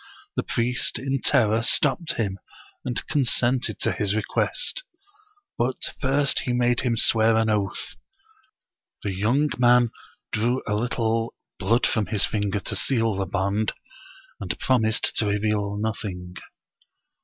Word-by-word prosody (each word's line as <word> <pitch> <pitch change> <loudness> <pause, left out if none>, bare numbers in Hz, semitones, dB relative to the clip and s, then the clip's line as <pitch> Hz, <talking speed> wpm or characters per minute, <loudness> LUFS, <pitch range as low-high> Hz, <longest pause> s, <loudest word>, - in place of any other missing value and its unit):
The - - +1
priest 120 +1 0
in 135 +2 -2
terror 115 -5 +3
stopped 150 +7 +2
him, 100 -4 -2 0.4
and 120 -5 -3
consented 125 -5 +1
to - - +2
his 105 -1 -1
request, 110 - -1 0.8
but 125 +2 +1 0.2
first 140 +1 +2
he 125 - -2
made 120 0 +2
him 120 -3 0
swear 110 0 +4
an 110 -1 +2
oath. 100 -4 -2 1.1
The 100 - -2
young 120 +10 +1
man 120 -1 +5 0.4
drew 120 +4 0
a 105 - 0
little 115 0 -1 0.2
blood 115 +6 +2
from 110 -3 0
his 105 -4 +3
finger 105 -1 -1
to 105 - -3
seal 115 +1 +1
the 95 0 -2
bond, 100 +3 0 0.7
and - - -3
promised 115 -2 +1
to 110 - +2
reveal 105 0 0
nothing. 100 -4 -4
110 Hz, 130 wpm, -24 LUFS, 105-125 Hz, 1.1 s, man